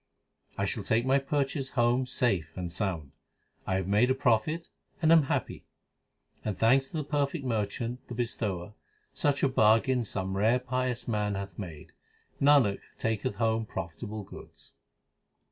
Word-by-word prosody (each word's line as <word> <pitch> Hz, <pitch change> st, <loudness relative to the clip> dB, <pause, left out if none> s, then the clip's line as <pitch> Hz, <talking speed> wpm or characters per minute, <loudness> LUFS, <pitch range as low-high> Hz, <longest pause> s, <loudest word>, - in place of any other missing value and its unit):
I -, -, 0 dB
shall -, -, -1 dB
take 115 Hz, +2 st, +1 dB
my 135 Hz, +1 st, +4 dB
purchase 135 Hz, 0 st, -1 dB
home 120 Hz, +2 st, +3 dB
safe 95 Hz, -, 0 dB
and 90 Hz, -2 st, -4 dB
sound. 85 Hz, -8 st, -2 dB, 0.6 s
I 95 Hz, -, +1 dB
have 95 Hz, -1 st, -1 dB
made 105 Hz, +5 st, +3 dB
a 130 Hz, -, +3 dB
profit 135 Hz, +6 st, +1 dB, 0.3 s
and 160 Hz, -1 st, +3 dB
am 165 Hz, -1 st, +8 dB
happy. -, -, -2 dB, 0.8 s
Thanks 115 Hz, +6 st, +3 dB
to 160 Hz, -, -6 dB
the 155 Hz, -, -1 dB
perfect 145 Hz, 0 st, -1 dB
merchant, 115 Hz, +2 st, -2 dB
the 120 Hz, -, -6 dB
bestower, 105 Hz, -5 st, -3 dB, 0.4 s
Such 145 Hz, -1 st, +1 dB
a -, -, +6 dB
bargain 125 Hz, +1 st, +3 dB
some 95 Hz, -3 st, -3 dB
rare 110 Hz, +5 st, +3 dB
pious 125 Hz, -1 st, -2 dB
man 105 Hz, -3 st, 0 dB
hath 100 Hz, +1 st, -6 dB
made. 80 Hz, -7 st, -8 dB, 0.5 s
Nanak 140 Hz, -8 st, +5 dB, 0.2 s
taketh 115 Hz, +3 st, -1 dB
home 115 Hz, -1 st, 0 dB
profitable 105 Hz, +4 st, -5 dB
goods. -, -, -13 dB
115 Hz, 145 wpm, -29 LUFS, 100-130 Hz, 0.8 s, am